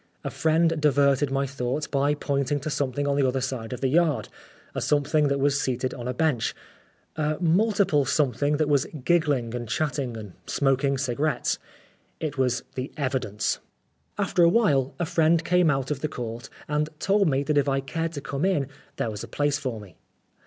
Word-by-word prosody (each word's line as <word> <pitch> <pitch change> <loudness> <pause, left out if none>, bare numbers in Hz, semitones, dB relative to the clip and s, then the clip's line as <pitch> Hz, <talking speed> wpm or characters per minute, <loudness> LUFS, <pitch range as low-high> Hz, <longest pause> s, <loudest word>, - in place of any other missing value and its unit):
A - - -3
friend 160 0 +2
diverted 140 -1 +3
my 135 +1 0
thoughts 135 +2 -2
by 145 +1 +1
pointing 140 -1 -1
to 155 +2 -3
something 145 0 -1
on 140 0 +1
the 140 -2 +3
other 130 +1 0
side 130 -3 -4
of 125 - -5
the 135 - +2
yard 155 +1 +2 0.4
a - - -3
something 150 +1 +2
that 140 0 0
was 140 +1 +2
seated 130 0 -1
on 120 -1 -6
a - - 0
bench, 150 -6 +1 0.6
a 155 0 0
multiple 185 -3 +3
something 145 +1 +1
that 155 -1 +1
was 145 -2 +2 0.2
giggling 145 -9 +2
and 120 -2 -5
chatting 135 -6 -1
and 105 -4 -9
smoking 135 0 +1
cigarettes. 140 +3 0 0.6
It 155 -3 -3
was 130 -2 0
The 130 +1 -4
Evidence. 130 -8 -1 0.6
After 200 -3 +1
awhile, 170 - +3
a 175 - -1
friend 165 0 +2
came 180 -1 +4
out 135 -1 0
of 145 - -1
the 155 - -1
Court 120 +1 -6 0.2
and 150 0 0
told 200 +1 +2
me 135 0 +1
that 150 0 0
if 140 0 +1
I 135 0 +1
cared 165 +4 -3
to 145 - -5
come 140 +2 -3
in, 155 -8 +1 0.3
there 115 - -2
was 105 -1 -6
a - - -7
place 145 0 0
for 125 -6 -3
me. 95 -6 -14
140 Hz, 190 wpm, -26 LUFS, 130-155 Hz, 0.6 s, came